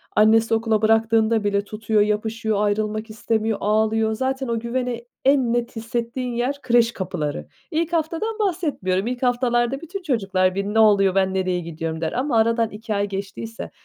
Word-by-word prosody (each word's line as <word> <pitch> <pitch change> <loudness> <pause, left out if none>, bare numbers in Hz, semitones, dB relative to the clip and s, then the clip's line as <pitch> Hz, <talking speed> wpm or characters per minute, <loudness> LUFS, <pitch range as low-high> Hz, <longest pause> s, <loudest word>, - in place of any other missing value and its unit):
annesi 225 +1 +4
okula 225 -1 +1
bıraktığında 225 0 +3
bile 200 0 +1
tutuyor, 215 0 0
yapışıyor, 215 0 0
ayrılmak 215 +1 -1
istemiyor, 220 0 -1
ağlıyor. 220 +1 +1
Zaten 265 +3 -2
o 230 -1 -1
güveni 240 0 -3 0.2
en 265 -4 +3
net 240 0 -2
hissettiğin 235 +2 -3
yer 255 +4 -2
kreş 235 -2 +3
kapıları. 155 -7 -4 0.2
İlk 335 +1 -1
haftadan 335 +8 -1
bahsetmiyorum, 295 - -1
ilk 250 +1 -3
haftalarda 245 +1 +1
bütün 365 +4 -6
çocuklar 195 - 0
bir, 200 0 -1
"Ne 210 +2 0
oluyor, 200 -3 +5
ben 190 -1 +2
nereye 185 -1 0
gidiyorum?" 165 -1 -5
der 160 - -1
ama 255 -1 0
aradan 230 0 +2
2 215 +1 -5
ay 200 0 0
geçtiyse, 200 +3 -6
225 Hz, 160 wpm, -22 LUFS, 205-245 Hz, 0.2 s, oluyor